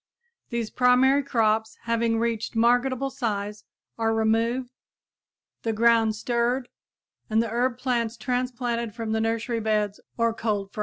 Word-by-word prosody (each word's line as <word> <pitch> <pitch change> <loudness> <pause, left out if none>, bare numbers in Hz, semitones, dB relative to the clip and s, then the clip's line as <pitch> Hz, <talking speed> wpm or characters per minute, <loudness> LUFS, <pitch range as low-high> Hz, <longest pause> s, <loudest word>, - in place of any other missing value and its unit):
These 235 -2 -3
primary 255 +3 +4
crops, 220 -4 +1
having 230 0 +1
reached 230 0 -2
marketable 245 +3 +2
size, 210 -4 -3 0.3
are 225 0 +1
removed, 230 +3 +1 0.9
the 225 - -1
ground 225 -1 +3
stirred 240 +3 0 0.6
and 220 0 +2
the 230 0 +1
herb 245 +1 0
plants 240 -3 -1
transplanted 245 -2 -2
from 225 -2 -4
nursery 225 +1 0
beds 210 -2 0 0.2
or 230 -1 +2
cold 205 -3 -2
frames. - - -9
230 Hz, 130 wpm, -25 LUFS, 220-245 Hz, 0.9 s, primary